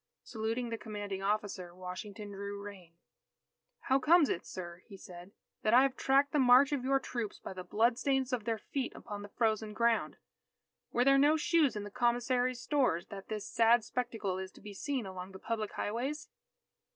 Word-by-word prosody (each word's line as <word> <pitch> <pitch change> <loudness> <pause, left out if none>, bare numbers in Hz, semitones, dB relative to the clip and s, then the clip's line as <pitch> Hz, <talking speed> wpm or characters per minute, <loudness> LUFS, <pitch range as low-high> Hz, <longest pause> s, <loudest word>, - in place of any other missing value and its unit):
Saluting 230 +2 -3
the 230 -1 -4
commanding 205 -3 -5
officer, 195 -3 -2
Washington 195 +3 -7
drew 200 0 -6
rein. 190 -5 -10 0.9
"How 265 0 +2
comes 315 +2 +5
it, 170 - -2
sir," 175 -1 -7
he 200 -4 -11
said, 180 0 -11 0.3
"that 215 +2 +3
I 255 - +8
have 270 -1 +1
tracked 275 +1 +3
the 295 - +2
march 260 +2 +6
of 280 -4 -1
your 270 +1 +2
troops 235 -5 -4
by - - -8
the 185 -1 -7
bloodstains 250 +5 +1
of 230 -4 -1
their 230 -1 0
feet 260 +4 -4
upon 205 -1 -7
the 205 - -9
frozen 220 -1 0
ground? 230 +1 +1 0.7
Were 245 - +2
there 275 0 +6
no 295 +3 +5
shoes 315 -4 +3
in 210 - -3
the 205 - -8
commissary's 245 +2 +1
stores, 250 - +1
that 195 -1 -8
this 215 -2 -4
sad 230 0 +4
spectacle 225 -6 -3
is 190 0 -6
to - - -15
be 210 -1 -9
seen 260 +3 -3
along 190 0 -7
the - - -8
public 220 +1 -3
highways?" 265 +8 -3
225 Hz, 185 wpm, -32 LUFS, 200-255 Hz, 0.9 s, I